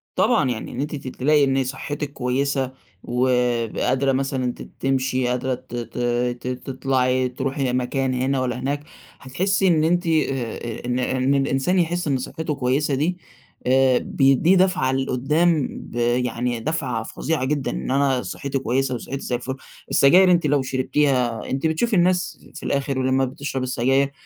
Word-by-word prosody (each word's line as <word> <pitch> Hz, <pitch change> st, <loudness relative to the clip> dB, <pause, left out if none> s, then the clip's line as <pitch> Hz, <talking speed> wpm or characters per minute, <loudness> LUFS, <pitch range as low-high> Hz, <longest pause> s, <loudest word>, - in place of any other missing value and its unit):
طبعًا 185 Hz, -, +3 dB
يعني 110 Hz, -, -5 dB
إن 130 Hz, -, -4 dB
أنتِ 150 Hz, +1 st, -3 dB
ت 135 Hz, -2 st, -8 dB
تلاقي 145 Hz, +3 st, +2 dB
إن 135 Hz, 0 st, +1 dB
صحتِك 140 Hz, +2 st, -5 dB
كويسة، 135 Hz, +1 st, -1 dB, 0.3 s
وقادرة 125 Hz, +1 st, +1 dB
مثلًا 130 Hz, -2 st, -1 dB
ت -, -, -13 dB, 0.2 s
تمشي، 130 Hz, -1 st, 0 dB
قادرة 125 Hz, +1 st, -1 dB
ت 120 Hz, -, -11 dB
ت 120 Hz, 0 st, -6 dB, 0.4 s
ت -, -, -6 dB
تطلعي، 130 Hz, 0 st, 0 dB
تروحي 130 Hz, 0 st, -2 dB
مكان 130 Hz, +1 st, 0 dB
هنا 130 Hz, +2 st, 0 dB
والّا 125 Hz, -1 st, -2 dB
هناك، 145 Hz, +3 st, -2 dB, 0.4 s
هتحسي 190 Hz, +9 st, 0 dB
إن 160 Hz, -3 st, +3 dB
أنتِ 175 Hz, +1 st, +1 dB
آآ 125 Hz, -7 st, -1 dB
إن 125 Hz, +1 st, -1 dB
إن 130 Hz, +2 st, +1 dB
الإنسان 135 Hz, +6 st, +1 dB
يحس 175 Hz, 0 st, 0 dB
إن 135 Hz, -, +2 dB
صحته 150 Hz, +4 st, -4 dB
كويسة 135 Hz, +2 st, 0 dB
دي، 165 Hz, +6 st, 0 dB, 0.5 s
آآ 130 Hz, -1 st, +4 dB
بيديه 135 Hz, +7 st, +3 dB
دفعة 180 Hz, -8 st, +2 dB
لقدام 140 Hz, +4 st, +1 dB
ب -, -, -10 dB
يعني 120 Hz, 0 st, 0 dB
دفعة 130 Hz, -4 st, -2 dB
فظيعة 150 Hz, +3 st, -2 dB
جدًا، 145 Hz, -1 st, -1 dB
إن -, -, -4 dB
أنا 135 Hz, -2 st, +2 dB
صحتي 140 Hz, -1 st, -4 dB
كويسة 130 Hz, 0 st, 0 dB
وصحتي 135 Hz, +4 st, -5 dB
زي 125 Hz, -, -2 dB
الفل، 130 Hz, +2 st, -4 dB, 0.3 s
السجاير 180 Hz, +6 st, +6 dB
أنتِ 170 Hz, -3 st, +3 dB
لو 145 Hz, -1 st, +2 dB
شربتيها 130 Hz, -2 st, 0 dB
أنتِ 135 Hz, +4 st, 0 dB
بتشوفي 200 Hz, +8 st, 0 dB
الناس 180 Hz, 0 st, +1 dB
في -, -, -9 dB
الآخر 140 Hz, -1 st, -1 dB
ولما 130 Hz, +1 st, +2 dB
بتشرب 135 Hz, 0 st, -4 dB
السجاير، 135 Hz, +2 st, +1 dB
135 Hz, 155 wpm, -22 LUFS, 125-145 Hz, 0.5 s, السجاير